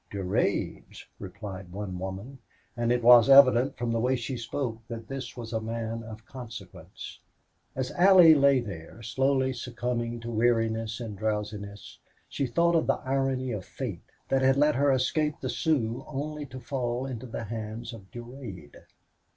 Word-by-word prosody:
"Durade's," 95 Hz, -10 st, -2 dB
replied 95 Hz, -3 st, -8 dB
one 95 Hz, -1 st, -5 dB
woman, 95 Hz, +8 st, -6 dB, 0.4 s
and 120 Hz, 0 st, 0 dB
it 120 Hz, -1 st, +1 dB
was 120 Hz, 0 st, +8 dB
evident 135 Hz, -1 st, +7 dB
from 120 Hz, -1 st, -2 dB
the 115 Hz, -, 0 dB
way 125 Hz, +3 st, +2 dB
she 130 Hz, +2 st, -4 dB
spoke 120 Hz, -1 st, -3 dB
that 115 Hz, -1 st, -7 dB
this 135 Hz, -2 st, -6 dB
was 115 Hz, -1 st, -7 dB
a 110 Hz, -, 0 dB
man 115 Hz, 0 st, -4 dB
of 110 Hz, 0 st, -10 dB
consequence. 115 Hz, -8 st, -10 dB, 0.6 s
As 130 Hz, -1 st, -2 dB
Allie 180 Hz, -3 st, +8 dB
lay 140 Hz, -3 st, +4 dB
there, 100 Hz, 0 st, -9 dB
slowly 130 Hz, +2 st, +1 dB
succumbing 120 Hz, -1 st, -3 dB
to 120 Hz, 0 st, -5 dB
weariness 115 Hz, -1 st, +1 dB
and 110 Hz, -4 st, -6 dB
drowsiness, 105 Hz, -1 st, -4 dB, 0.3 s
she 140 Hz, -, -2 dB
thought 170 Hz, +7 st, +2 dB
of 165 Hz, -, +2 dB
the -, -, +2 dB
irony 130 Hz, -1 st, 0 dB
of 105 Hz, -5 st, -4 dB
fate -, -, -6 dB, 0.3 s
that 135 Hz, 0 st, +2 dB
had 135 Hz, 0 st, +4 dB
let 150 Hz, +1 st, +4 dB
her 140 Hz, +1 st, +3 dB
escape 150 Hz, +3 st, +1 dB
the -, -, -4 dB
Sioux 125 Hz, -8 st, 0 dB
only 150 Hz, +1 st, -4 dB
to 130 Hz, 0 st, -9 dB
fall 125 Hz, 0 st, -2 dB
into 130 Hz, -2 st, -6 dB
the 115 Hz, -, -5 dB
hands 115 Hz, +2 st, -6 dB
of 100 Hz, -4 st, -12 dB
Durade. 120 Hz, -, -9 dB
120 Hz, 160 wpm, -28 LUFS, 110-135 Hz, 0.6 s, was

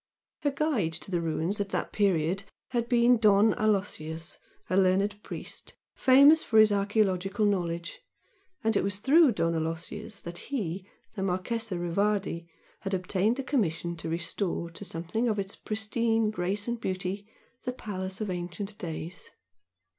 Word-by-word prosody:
Her 290 Hz, -, +2 dB
guide 275 Hz, -, 0 dB
to 170 Hz, +4 st, -5 dB
the 175 Hz, -2 st, +1 dB
ruins 165 Hz, +5 st, -1 dB
at 200 Hz, -, -3 dB
that -, -, -2 dB
period 190 Hz, -1 st, +1 dB, 0.2 s
had 240 Hz, -2 st, -1 dB
been 240 Hz, 0 st, +5 dB
Don 210 Hz, 0 st, +5 dB
Aloysius, 170 Hz, -7 st, -1 dB, 0.3 s
a 185 Hz, -, 0 dB
learned 195 Hz, +2 st, +2 dB
priest, -, -, -7 dB, 0.2 s
famous 280 Hz, +4 st, +7 dB
for 220 Hz, -, +1 dB
his 215 Hz, -1 st, +8 dB
archaeological 200 Hz, -1 st, +1 dB
knowledge 170 Hz, -, -1 dB, 0.6 s
and 225 Hz, 0 st, +2 dB
it -, -, +3 dB
was 200 Hz, 0 st, -1 dB
through 280 Hz, +6 st, +5 dB
Don 165 Hz, -4 st, +1 dB
Aloysius 165 Hz, +6 st, -4 dB
that 170 Hz, 0 st, -7 dB
he, 195 Hz, -, -3 dB, 0.2 s
the 205 Hz, -, -5 dB
Marchese 195 Hz, +3 st, -1 dB
Rivardi, 175 Hz, 0 st, 0 dB, 0.3 s
had 195 Hz, -1 st, -2 dB
obtained 190 Hz, +4 st, +1 dB
the 270 Hz, -, -3 dB
commission 170 Hz, -, 0 dB
to 165 Hz, 0 st, -5 dB
restore 170 Hz, +1 st, -2 dB
to 165 Hz, -, -8 dB
something 185 Hz, +7 st, -1 dB
of 215 Hz, -, 0 dB
its 195 Hz, 0 st, -3 dB
pristine 220 Hz, 0 st, 0 dB
grace 200 Hz, +2 st, -2 dB
and 235 Hz, -1 st, -2 dB
beauty 190 Hz, +1 st, -3 dB, 0.4 s
the 250 Hz, -, 0 dB
palace 190 Hz, -6 st, -5 dB
of 210 Hz, -3 st, -2 dB
ancient 180 Hz, +4 st, -5 dB
days. 165 Hz, +1 st, -6 dB
200 Hz, 150 wpm, -29 LUFS, 175-220 Hz, 0.6 s, his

